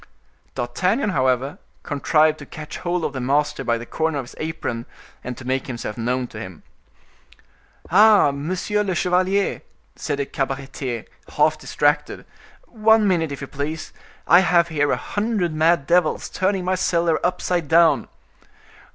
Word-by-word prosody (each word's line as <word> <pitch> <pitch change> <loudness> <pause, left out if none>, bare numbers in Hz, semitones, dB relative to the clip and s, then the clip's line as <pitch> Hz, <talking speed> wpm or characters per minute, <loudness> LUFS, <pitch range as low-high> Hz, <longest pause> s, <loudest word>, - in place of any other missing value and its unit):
D'Artagnan, 185 - 0
however, 130 -2 0 0.2
contrived 155 +2 +2
to - - -9
catch 155 -1 -8
hold 175 -1 -1
of - - -3
the 130 - -4
master 145 +3 0
by 115 0 +1
the 120 - -8
corner 160 +3 -1
of 135 - -3
his - - -14
apron, 155 -7 -4 0.4
and 125 -1 -6
to 125 - -10
make 130 +1 -1
himself 120 -4 -5
known 125 +2 -1
to 110 - -9
him. 95 -5 -9 1.3
"Ah, 210 -4 +6
monsieur 180 +8 -2
le 190 -3 -1
chevalier," 185 +3 +1 0.3
said 145 -2 -3
the 140 - -1
cabaretier, 135 -3 -4 0.3
half - - +4
distracted, - - 0 0.4
"one 220 -1 +3
minute 165 -5 +1
if 140 - -6
you 140 - -5
please. 150 +4 -5 0.3
I 175 - +7
have 170 -1 +3
here 145 -2 +1
a - - +1
hundred 205 -5 -2
mad 160 -1 +2
devils 175 -1 +1
turning 190 -1 -1
my 185 - +1
cellar 170 -3 +1
upside 180 -2 -1
down." 160 -2 +4
155 Hz, 150 wpm, -22 LUFS, 135-180 Hz, 1.3 s, I